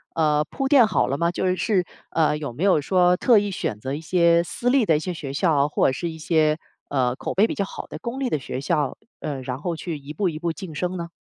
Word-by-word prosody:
呃， 150 -2 +3
铺 270 - -3
垫 265 -6 +6
好 - - +1
了 135 - -1
吗？ 170 +3 +1
就 175 - -2
是 185 0 +1
是， 190 -4 +1 0.3
呃， 155 -2 +2
有 145 -5 -5
没 155 - -4
有 195 -5 +4
说 180 +3 +3
特 235 +2 +5
意 205 0 -2
选 110 - -3
择 130 +6 -5
一 145 - -3
些 170 +1 +3
私 235 +8 -2
立 260 -2 +4
的 160 - +3
一 - - +1
些 180 +2 -3
学 140 -5 -6
校， 145 -2 +2
或 150 - +2
者 - - +2
是 170 +6 -3
一 160 - -8
些 155 -1 +2 0.3
呃， 130 -3 +1
口 - - -4
碑 200 - +4
比 - - -2
较 200 - -1
好 - - -8
的 - - -7
公 235 +2 -5
立 260 - 0
的 - - +1
学 130 0 -5
校， 140 -1 0 0.2
呃， 140 -3 -4
然 130 0 -4
后 170 +4 -3
去 165 -1 -5
一 145 +1 -9
步 185 +4 0
一 155 - -5
步 170 0 -1
晋 170 -1 -8
升 180 +4 -2
呢？ 170 -1 -5
165 Hz, 295 characters per minute, -23 LUFS, 150-185 Hz, 0.3 s, 垫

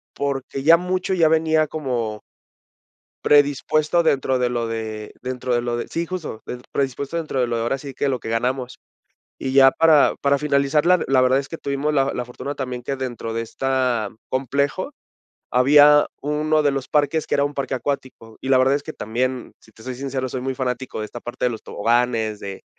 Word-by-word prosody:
porque 135 -1 -3
ya 165 +3 +7
mucho 185 +2 -2
ya 165 -3 +4
venía 160 0 +2
como 120 -8 -3 1.0
predispuesto 150 +3 +3
dentro 135 -5 +1
de 125 - +2
lo 120 -1 -1
de 110 -1 -5
dentro 125 -1 -2
de 120 - +1
lo 120 -1 -2
de 120 - -4
sí, 170 +1 -3
justo, 165 -11 -6
del 125 - -6
predispuesto 140 +3 -2
dentro 155 -5 -2
de 125 - +2
lo, 120 - -2
ahora 120 +4 -1
sí 135 0 -9
que 140 - -1
lo 130 - 0
que 110 - -8
ganamos. 125 +3 -2 0.6
Y 130 - -3
ya 135 0 +7
para 160 -3 +4
para 140 0 +3
finalizar, 145 +1 +1
la 180 0 +5
la 135 -1 +4
verdad 130 +1 +4
es 135 - -7
que 165 - -6
tuvimos 140 +1 -2
la 135 -1 +1
la 125 - -2
fortuna 130 +4 -6
también 125 -2 -5
que 135 - -2
dentro 120 -3 -5
de 115 - -1
esta 125 -2 -1 0.2
complejo, 140 - -1 0.6
había 145 +3 +6
uno 150 +1 +1
de 145 - +3
los 135 -2 -4
parques, 150 +1 +1
que - - 0
era 140 - +2
un 145 0 -3
parque 135 -1 -2
acuático, 130 -4 -5
y 130 - -6
la 130 -1 +5
verdad 135 +2 +4
es 145 - -1
que 155 - -7
también, 125 +3 -3
si 110 - -21
te 110 - -17
soy 130 - -4
sincero, 130 0 -3
soy 130 - -4
muy 130 +1 -3
fanático 125 -2 -3
de - - -3
esta 120 +2 -9
parte 120 - -5
de 125 - +3
los 115 - -7
toboganes, 115 -1 0
de 100 -1 -8
135 Hz, 205 wpm, -22 LUFS, 125-145 Hz, 1.0 s, ya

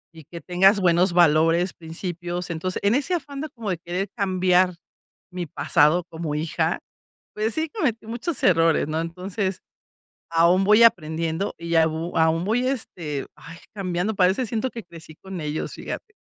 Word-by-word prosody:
y 160 -2 -13
que 170 +3 -10
tengas 190 +3 +4
buenos 180 0 +3
valores, 170 +1 +4
principios. 175 +1 -5
Entonces, 175 +3 -3
en 200 +2 +3
ese 285 +8 +1
afán 280 -4 -5
como 225 -4 -4
de 175 - -3
querer 180 +3 -3
cambiar 185 -3 +2 0.6
mi 180 -1 -5
pasado 150 +4 +2
como 160 -2 -4
hija, 155 +1 -1 0.6
pues 215 +1 -1
sí, 315 0 -1
cometí 245 - -2
muchos 240 +7 -3
errores, 165 -4 +3
¿no? 155 +1 -1
Entonces 185 +3 -3 0.7
aún 170 +3 +4
voy 210 +3 +6
aprendiendo 165 -2 +1
y 170 0 -3
au 160 +1 +1
aún 160 +1 +2
voy, 240 +5 +1
este, 170 - -4
ay, 165 +3 -12 0.2
cambiando. 195 +1 -2
Parece 190 +6 +2
siento 225 +3 -2
que 230 - -7
crecí 165 -3 -13
con 190 -3 -7
ellos, 150 0 -3
fíjate. 435 - -7
180 Hz, 155 wpm, -23 LUFS, 165-205 Hz, 0.7 s, voy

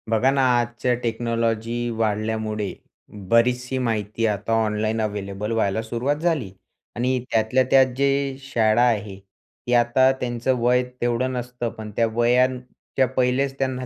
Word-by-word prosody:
बघा 115 +4 +3
ना, 135 0 +1 0.2
आजच्या 120 +1 -1
टेक्नॉलॉजी 115 0 -1
वाढल्यामुळे 110 -1 -2 0.6
बरीचशी 125 +2 +2
माहिती 115 -2 -1
आता 105 +2 -2
ऑनलाईन 110 +1 -1
अव्हेलेबल 105 0 -4
व्हायला 110 -2 0
सुरुवात 120 +5 -1
झाली. 150 - -1 0.4
आणि 125 +2 0
त्यातल्या 110 +4 +2
त्यात 135 -1 +7
जे 140 -1 +1
शाळा 115 -4 +2
आहेत, 105 -5 0 0.5
ती 120 - 0
आता 120 +2 +4
त्यांचं 120 +1 -1
वय 125 +1 +3 0.2
तेवढं 120 +2 0
नसतं, 125 -1 -4
पण 110 -1 -9
त्या 115 - +3
वयाच्या 125 +2 +1
पहिलेच 130 +2 +1
त्यांना 130 -1 -2
120 Hz, 130 wpm, -23 LUFS, 110-125 Hz, 0.6 s, त्यात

